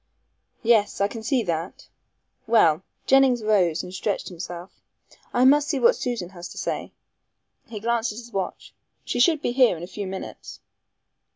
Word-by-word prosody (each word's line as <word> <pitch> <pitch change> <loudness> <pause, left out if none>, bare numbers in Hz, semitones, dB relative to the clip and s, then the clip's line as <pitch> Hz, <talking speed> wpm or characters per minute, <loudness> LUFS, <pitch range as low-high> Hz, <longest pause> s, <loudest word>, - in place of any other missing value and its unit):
"Yes! 220 -3 +3
I 200 - +3
can 225 +2 -8
see 245 +2 +1
that. 170 -1 -4 0.6
Well," 185 -8 +4 0.2
Jennings 265 -3 +4
rose 185 -7 +2
and 180 - -9
stretched 195 +1 -2
himself. 175 0 -8 0.6
"I 245 +1 +3
must 290 +2 +5
see 280 - 0
what 240 - +5
Susan 235 -8 -3
has 175 -2 -9
to - - -12
say"; - - -3 0.8
he 220 -2 -7
glanced 230 +1 0
at 210 - -9
his 235 0 -10
watch; 190 -2 -4 0.3
"she - - -2
should 310 +3 +3
be - - 0
here 250 -7 +4
in 165 - -8
a - - -3
few 195 +2 -6
minutes." 190 0 -8
215 Hz, 170 wpm, -24 LUFS, 185-245 Hz, 0.8 s, must